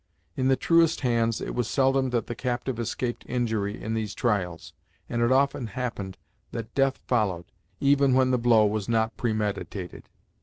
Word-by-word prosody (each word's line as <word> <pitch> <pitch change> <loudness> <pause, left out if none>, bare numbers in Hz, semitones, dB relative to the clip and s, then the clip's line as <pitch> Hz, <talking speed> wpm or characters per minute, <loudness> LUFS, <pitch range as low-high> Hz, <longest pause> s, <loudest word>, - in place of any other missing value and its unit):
In 130 - 0
the 135 - +4
truest 165 +2 +3
hands 115 -3 +1
it - - -4
was 120 -2 -1
seldom 135 0 +2
that 120 -3 0
the - - -4
captive 125 0 -3
escaped 120 +1 -3
injury 110 -5 -1
in 110 - -4
these 110 -2 -3
trials, 95 -8 -1 0.3
and 120 - -2
it 120 +1 +3
often 135 -2 +2
happened 105 -4 -4 0.3
that 115 0 -6
death 135 -1 +2
followed, 100 -8 0 0.3
even 140 -2 +4
when 130 0 +3
the 125 - +2
blow 115 -2 +5
was 105 0 -1
not 110 -1 +1
premeditated. 105 -5 -3
120 Hz, 165 wpm, -26 LUFS, 110-130 Hz, 0.3 s, blow